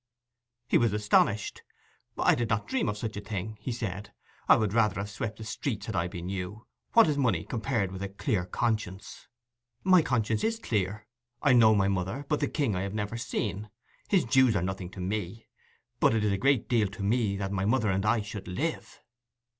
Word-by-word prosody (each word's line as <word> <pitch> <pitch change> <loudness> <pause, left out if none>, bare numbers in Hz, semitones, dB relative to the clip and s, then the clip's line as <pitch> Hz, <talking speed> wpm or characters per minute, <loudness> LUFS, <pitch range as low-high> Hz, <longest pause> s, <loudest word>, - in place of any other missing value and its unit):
He - - +4
was 115 -3 +2
astonished. 105 0 +2 0.6
'I - - +4
did 120 -2 -1
not 105 - 0
dream 260 - 0
of 105 - -3
such 110 0 -4
a - - -4
thing,' 105 +1 -5
he 130 - -3
said. 105 -4 -5 0.4
'I - - +9
would 105 -3 0
rather 110 -4 +3
have 100 +1 -4
swept 110 +1 -4
the 110 - -8
streets, 110 -1 -3
had - - -4
I 85 +1 +1
been 90 -1 -7
you. 95 +4 -5 0.3
What 230 -4 +7
is 145 -2 0
money 125 -4 +1
compared 115 -5 -1
with 95 0 -7
a 100 - -3
clear 100 - -1
conscience?' 105 -2 -3 0.6
'My 185 -2 +6
conscience 115 -7 0
is 225 0 +1
clear. 105 - -2 0.4
I 145 -3 +5
know 110 -3 +6
my 100 -1 +3
mother, 100 +8 -2
but 150 - +1
the - - +1
king 135 -10 0
I 90 - -1
have 100 +1 -4
never 105 +1 -3
seen. 105 -3 -3 0.4
His 190 -8 +3
dues 125 -1 +4
are 90 - +1
nothing 95 -1 -4
to 95 - -11
me. 100 +3 -3 0.5
But - - +4
it 110 - +1
is 105 - +2
a 100 - +1
great 135 +1 +2
deal 115 -4 +2
to 100 +1 -7
me 105 -1 +1
that 95 -1 -3
my 95 -1 -1
mother 110 -1 +2
and 95 +1 0
I 110 +1 +2
should 100 -2 -7
live. 150 - -4
105 Hz, 210 wpm, -28 LUFS, 100-120 Hz, 0.6 s, I